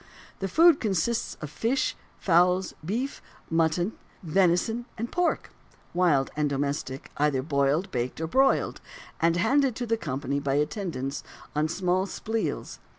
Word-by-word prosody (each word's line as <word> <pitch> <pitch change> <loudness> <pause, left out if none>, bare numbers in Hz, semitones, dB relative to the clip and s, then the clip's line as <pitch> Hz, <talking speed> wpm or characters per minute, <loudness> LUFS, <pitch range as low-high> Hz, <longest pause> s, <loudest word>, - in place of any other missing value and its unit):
The 195 - -1
food 330 - +6
consisted 215 -1 -1
of 150 - -5
fish, 235 - 0 0.2
fowls, 180 +1 +3
beef, 235 - -3 0.3
mutton, 165 +4 +2 0.3
venison, 185 +7 +2
and 230 +2 -4
pork 355 -1 0 0.4
wild 170 -7 +3
and 150 -1 +1
domestic 140 -1 -3
either 145 -3 +2
boiled, 140 +4 +1
baked, 125 +2 -2
or 160 - -1
broiled, 265 +11 +2 0.4
and 165 0 +3
handed 260 +5 +3
to 245 - -3
the 230 -1 +1
company 140 -5 -2
by 140 -1 0
the 145 - +4
attendants 150 -6 -4 0.3
on 150 +1 +2
small 185 +3 0
sples. 225 +3 -3
175 Hz, 140 wpm, -27 LUFS, 145-225 Hz, 0.4 s, food